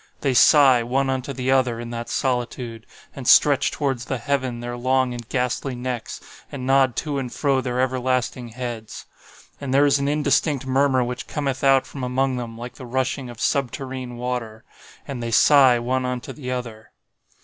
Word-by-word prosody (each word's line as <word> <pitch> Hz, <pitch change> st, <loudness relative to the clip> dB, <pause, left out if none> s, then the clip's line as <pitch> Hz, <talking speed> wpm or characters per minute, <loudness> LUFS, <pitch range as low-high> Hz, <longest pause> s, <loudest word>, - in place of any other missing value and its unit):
They 135 Hz, -2 st, +1 dB
sigh 135 Hz, -2 st, +6 dB
one 135 Hz, +3 st, 0 dB
unto 130 Hz, +1 st, -3 dB
the 130 Hz, 0 st, -2 dB
other 130 Hz, -3 st, +2 dB
in 120 Hz, 0 st, -6 dB
that 120 Hz, 0 st, -5 dB
solitude, 120 Hz, -3 st, -3 dB, 0.3 s
and 130 Hz, -3 st, -7 dB
stretch 145 Hz, -2 st, +5 dB
towards 135 Hz, -5 st, -2 dB
the 135 Hz, -, -2 dB
heaven 130 Hz, -1 st, -2 dB
their 120 Hz, 0 st, -5 dB
long 130 Hz, +1 st, +1 dB
and 120 Hz, -2 st, -8 dB
ghastly 125 Hz, +1 st, -1 dB
necks, 125 Hz, -2 st, -5 dB, 0.3 s
and 130 Hz, -3 st, -6 dB
nod 135 Hz, -2 st, +3 dB
to 145 Hz, 0 st, -2 dB
and 125 Hz, -2 st, -5 dB
fro 140 Hz, -3 st, +1 dB
their 125 Hz, 0 st, -3 dB
everlasting 130 Hz, -1 st, -1 dB
heads. 120 Hz, -2 st, -7 dB, 0.6 s
And 140 Hz, -2 st, -4 dB
there 140 Hz, +2 st, +4 dB
is 140 Hz, 0 st, +3 dB
an 140 Hz, -, -1 dB
indistinct 145 Hz, -1 st, +1 dB
murmur 130 Hz, -1 st, +2 dB
which 125 Hz, 0 st, -5 dB
cometh 140 Hz, -3 st, -3 dB
out 135 Hz, -1 st, +4 dB
from 135 Hz, -2 st, -8 dB
among 130 Hz, +1 st, 0 dB
them 115 Hz, -2 st, -6 dB
like 120 Hz, +1 st, -7 dB
the 130 Hz, -, -9 dB
rushing 130 Hz, +1 st, -2 dB
of 120 Hz, -, -10 dB
subterrene 130 Hz, -2 st, -2 dB
water. 120 Hz, -2 st, -4 dB, 0.4 s
And 135 Hz, -4 st, -5 dB
they 115 Hz, -, -3 dB
sigh 130 Hz, +1 st, +6 dB
one 130 Hz, +2 st, -1 dB
unto 125 Hz, -1 st, -4 dB
the 130 Hz, -4 st, -7 dB
other. 115 Hz, -4 st, -6 dB
130 Hz, 180 wpm, -22 LUFS, 120-135 Hz, 0.6 s, sigh